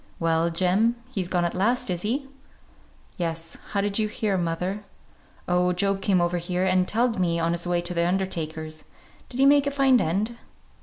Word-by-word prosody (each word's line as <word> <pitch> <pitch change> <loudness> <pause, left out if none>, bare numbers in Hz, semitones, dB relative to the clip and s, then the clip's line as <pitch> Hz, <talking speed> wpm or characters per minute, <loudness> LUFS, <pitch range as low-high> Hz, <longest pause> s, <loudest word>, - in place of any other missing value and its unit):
"Well, 165 0 +2
Jem, 190 +7 +2 0.2
he's 195 -8 -2
gone 175 -1 0
at 170 - -1
last, 215 +2 +1
is 175 -1 -2
he?" 265 +7 -2 0.9
"Yes. 165 -2 -4
How 200 - 0
did 205 +1 -1
you 215 - +1
hear, 210 -1 -1
mother?" 180 +3 -2 0.6
"Oh, 180 0 +2
Job 195 +2 0
came 190 -1 +2
over 175 0 +1
here 180 +2 -1
and 185 -1 +2
telled 230 -1 +1
me, 170 -2 +1
on 165 0 +1
his 170 +1 -1
way 175 0 +1
to 175 +1 -3
the 170 0 +1
undertaker's. 160 -4 -3 0.4
Did 250 - -6
he 270 - +5
make 285 0 +5
a - - +3
fine 270 -3 +4
end?" 205 +9 -1
180 Hz, 190 wpm, -25 LUFS, 170-210 Hz, 0.9 s, he